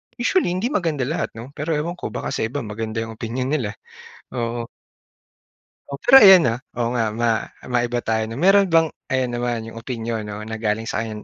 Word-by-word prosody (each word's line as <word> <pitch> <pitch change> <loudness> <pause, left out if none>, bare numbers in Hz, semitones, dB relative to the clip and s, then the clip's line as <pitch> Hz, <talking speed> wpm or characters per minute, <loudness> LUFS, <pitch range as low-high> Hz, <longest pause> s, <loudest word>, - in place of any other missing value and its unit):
usually 255 - +1
hindi 225 +8 -1
maganda 165 - 0
lahat 140 -1 -3
'no 115 +4 -9
pero 150 +3 -2
ewan 170 +4 -3
ko - - -3
baka - - -4
sa 110 - -1
iba 130 +3 -4
maganda 110 +1 -4
'yong 115 0 -7
opinyon 125 +3 -3
nila, 120 -9 -1 0.6
oo. 120 -1 -2 1.2
Pero 245 - +6
ayan, 190 -6 +9
ah, 115 - -4 0.2
oo 120 -1 -1
nga 115 -3 -1
ma 115 -1 0 0.2
maiba 120 0 0
tayo 110 0 0
'no. 115 - -6
Meron 195 +7 +5
bang 165 -3 +3 0.2
ayan 130 -2 0
naman 120 -2 -2
'yong 115 - -8
opinyon 115 -2 -4
'no 105 0 -6
na 110 +1 -6
galing 110 0 -1
sa 115 - -3
kan 110 -1 -5
120 Hz, 190 wpm, -22 LUFS, 115-150 Hz, 1.2 s, ayan